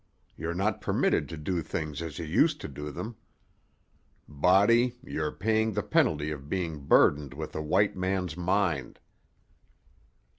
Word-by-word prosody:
You're 85 +2 -4
not 100 +4 0
permitted - - +1
to 80 - -6
do 85 +3 -2
things 75 0 -4
as 80 -3 -6
you 85 - -4
used 75 - +2
to - - -5
do 75 +2 -7
them. 110 +10 -6 1.1
Body, 100 - +3
you're 75 - -3
paying 110 +1 0
the - - -1
penalty 75 0 +1
of 70 -1 -7
being 85 -5 -2
burdened 70 -2 +4
with 80 +1 -6
a 80 - -2
white 95 +7 +2
man's 95 -2 -2
mind." 90 -6 0
85 Hz, 145 wpm, -28 LUFS, 75-95 Hz, 1.1 s, burdened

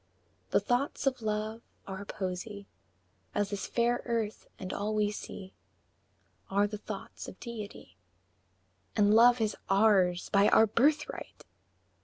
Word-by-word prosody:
V. - - -40
The - - +6
thoughts 260 +3 -1
of 265 -2 +1
Love 215 +1 -2 0.2
are 190 +1 -6
Poesy, 200 +2 -5 0.7
As 205 0 0
this 200 -2 -3
fair 240 +1 +1
earth 230 -3 -2
and 185 0 -5
all 210 +1 -2
we 210 -1 +2
see 190 -2 -8 1.0
Are 200 +1 +3
the 210 0 -5
thoughts 205 -2 -7
of - - -10
Deity 210 - -8 1.0
And 205 0 +4
Love 240 +2 +7
is 215 -2 0
ours 195 -3 +4
by 200 0 +5
our 220 - +6
birthright! 290 +8 0
210 Hz, 135 wpm, -30 LUFS, 200-230 Hz, 1.0 s, Love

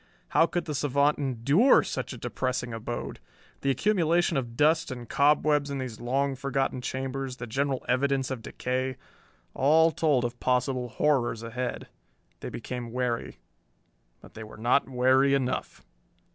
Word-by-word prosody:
How 165 - +4
could 175 0 -2
the 150 - -4
savant 145 +1 +1
endure 140 - +4
such - - -4
a - - -7
depressing 125 -2 -3
abode! 115 +1 -5 0.4
The 140 - 0
accumulation 175 - +2
of 120 -3 -3
dust 160 +2 +3
and 120 -2 -7
cobwebs 150 0 +3
in 140 - -3
these 125 -5 -5
long 135 +3 0
forgotten 135 -1 -1
chambers, 130 0 -4
the 120 - -6
general 135 +3 -2
evidence 135 +1 +1
of 130 -3 -4
decay 130 +2 -3 0.6
all 160 +4 +4
told 145 -7 +1
of 120 0 -5
possible 125 0 0
horrors 120 -5 0
ahead. 125 +2 -4 0.5
They - - -6
became 125 -2 -6
wary. 125 -1 -3 0.8
But - - -15
they 110 - -8
were 110 - -12
not 120 +5 +2
wary 130 +2 +3
enough! 130 -2 -3
130 Hz, 145 wpm, -27 LUFS, 125-140 Hz, 0.8 s, How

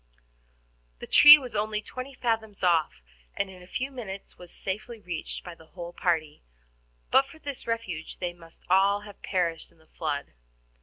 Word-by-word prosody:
The - - -8
tree 295 0 +10
was 255 -6 -7
only 210 0 0
twenty 255 +5 -8
fathoms 220 -5 -2
off, 160 - +2 0.3
and 195 -1 -1
in 185 -1 -13
a 180 - -14
few 260 +8 -3
minutes 205 -7 -8
was 180 -1 -11
safely 215 +4 -5
reached 175 -5 -5
by 175 - -8
the 160 -1 -17
whole 175 0 -8
party; 160 -5 -1 0.7
but 270 - +5
for 320 - -14
this 285 -6 -7
refuge 190 -9 -4
they 175 -1 -3
must 165 -1 -17
all 195 +2 +4
have 205 -1 -13
perished 170 -4 -1
in - - -27
the 160 - -24
flood. 150 - -4
190 Hz, 170 wpm, -27 LUFS, 170-230 Hz, 0.7 s, tree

